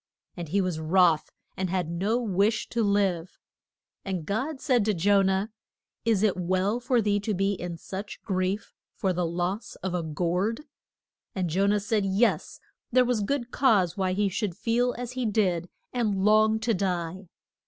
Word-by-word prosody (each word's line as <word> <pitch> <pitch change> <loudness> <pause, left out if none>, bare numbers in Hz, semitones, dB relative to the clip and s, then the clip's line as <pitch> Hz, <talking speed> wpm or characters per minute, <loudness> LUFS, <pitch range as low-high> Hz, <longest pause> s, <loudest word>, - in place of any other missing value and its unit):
And 170 -3 -6
he 200 +5 +2
was 180 -4 -2
wroth, 165 0 +3 0.3
and 185 -1 -2
had 180 -2 -1
no 195 +7 0
wish 215 -1 +1
to 235 - -1
live. 195 -4 0 0.7
And 185 -5 -3
God 265 - -2
said 250 -6 +2
to 215 -2 +1
Jo 200 +4 +4
nah, 190 +1 +1 0.6
Is 220 -3 +2
it 210 -3 +3
well 185 +5 0
for 245 -1 +1
thee 205 0 +2
to 205 +1 -2
be 195 +2 +1
in 175 -3 -5
such 195 +5 -7
grief 190 +1 -2 0.2
for 190 -2 0
the 175 -1 0
loss 180 +5 -3
of 190 -1 -2
a 180 - 0
gourd? 180 - -1 0.7
And 180 -4 -1
Jo 195 +4 +2
nah 205 +1 +3
said, 205 +1 0
Yes. 195 +5 +1 0.3
There 250 +1 +5
was 245 -3 +1
good 245 +2 -2
cause 195 - +3
why 190 -2 0
he 205 +2 +1
should 190 -1 -2
feel 245 +2 +1
as 245 0 -5
he 255 0 -3
did 185 -6 +1 0.2
and 210 -6 0
long 215 +1 +4
to 230 +1 +1
die. 185 -1 -2
195 Hz, 175 wpm, -27 LUFS, 180-220 Hz, 0.7 s, There